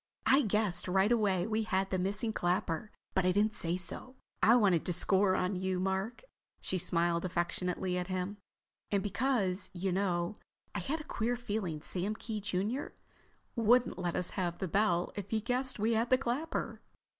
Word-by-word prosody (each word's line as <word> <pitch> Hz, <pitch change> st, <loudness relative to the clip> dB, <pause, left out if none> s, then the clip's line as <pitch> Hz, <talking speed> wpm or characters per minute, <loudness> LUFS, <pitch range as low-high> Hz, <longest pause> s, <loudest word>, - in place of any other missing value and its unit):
"I 270 Hz, +2 st, +6 dB
guessed 210 Hz, -, +1 dB
right 190 Hz, +4 st, +3 dB
away 200 Hz, -6 st, +2 dB
we 220 Hz, +1 st, 0 dB
had 195 Hz, -3 st, 0 dB
the 185 Hz, -, +1 dB
missing 205 Hz, +4 st, -1 dB
clapper. 180 Hz, +1 st, -1 dB, 0.2 s
But 190 Hz, -, +2 dB
I 185 Hz, -, +3 dB
didn't 210 Hz, +3 st, +2 dB
say 170 Hz, -1 st, -1 dB
so. 220 Hz, +8 st, -5 dB, 0.3 s
I 230 Hz, -, +7 dB
wanted 195 Hz, -9 st, +4 dB
to 180 Hz, -, +2 dB
score 190 Hz, +2 st, +4 dB
on 185 Hz, +1 st, 0 dB
you, 185 Hz, 0 st, -1 dB
Mark—" 190 Hz, -, -2 dB, 0.4 s
she 185 Hz, -, -1 dB
smiled 170 Hz, -1 st, +1 dB
affectionately 180 Hz, +1 st, -1 dB
at 180 Hz, -, -3 dB
him—"and 195 Hz, +1 st, -5 dB
because, 205 Hz, -3 st, 0 dB
you 190 Hz, +1 st, -1 dB
know, 180 Hz, 0 st, 0 dB, 0.4 s
I -, -, -2 dB
had 310 Hz, +3 st, -2 dB
a -, -, -8 dB
queer 240 Hz, -3 st, -1 dB
feeling 205 Hz, -10 st, -3 dB
Sam 195 Hz, +4 st, -1 dB
Kee, 215 Hz, -1 st, -5 dB
junior, 205 Hz, +7 st, -2 dB, 0.6 s
wouldn't 235 Hz, -1 st, +3 dB
let 175 Hz, -2 st, -1 dB
us 180 Hz, -, -1 dB
have 175 Hz, -3 st, -2 dB
the 190 Hz, -, -2 dB
bell 180 Hz, -1 st, +2 dB
if 205 Hz, -1 st, -5 dB
he 220 Hz, -, +1 dB
guessed 255 Hz, +3 st, 0 dB
we 220 Hz, +2 st, +1 dB
had 230 Hz, +2 st, +1 dB
the 255 Hz, -, +6 dB
clapper." 275 Hz, +5 st, -2 dB
195 Hz, 175 wpm, -32 LUFS, 180-220 Hz, 0.6 s, I